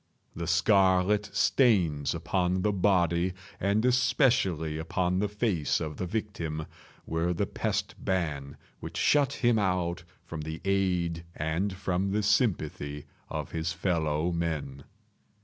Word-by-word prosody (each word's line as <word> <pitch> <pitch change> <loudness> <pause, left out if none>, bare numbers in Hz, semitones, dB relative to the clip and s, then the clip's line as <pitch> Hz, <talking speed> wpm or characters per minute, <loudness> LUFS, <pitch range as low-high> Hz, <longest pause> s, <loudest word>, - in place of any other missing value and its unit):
The 85 -1 -4
scarlet 95 +3 +3
stains 85 - +2
upon 90 +2 0
the 105 - +2
body 90 -2 +2 0.3
and 100 +4 +1
especially 120 - +2
upon 90 +3 0
the 105 - +1
face 100 - 0
of 75 -1 -5
the 90 - -3
victim, 85 -7 -3 0.4
were 85 +2 -1
the - - 0
pest - - -2
ban 75 -7 -2 0.2
which - - -7
shut 145 -2 +3
him 120 -4 +2
out 90 -3 0 0.2
from 80 -2 -6
the 80 +1 -5
aid 90 -4 0
and 80 +6 -1
from 95 +1 -1
the 105 0 +1
sympathy 80 - 0 0.2
of - - -4
his 80 +1 -2
fellow 80 -2 0
men. 75 -5 -3
90 Hz, 130 wpm, -28 LUFS, 80-100 Hz, 0.4 s, scarlet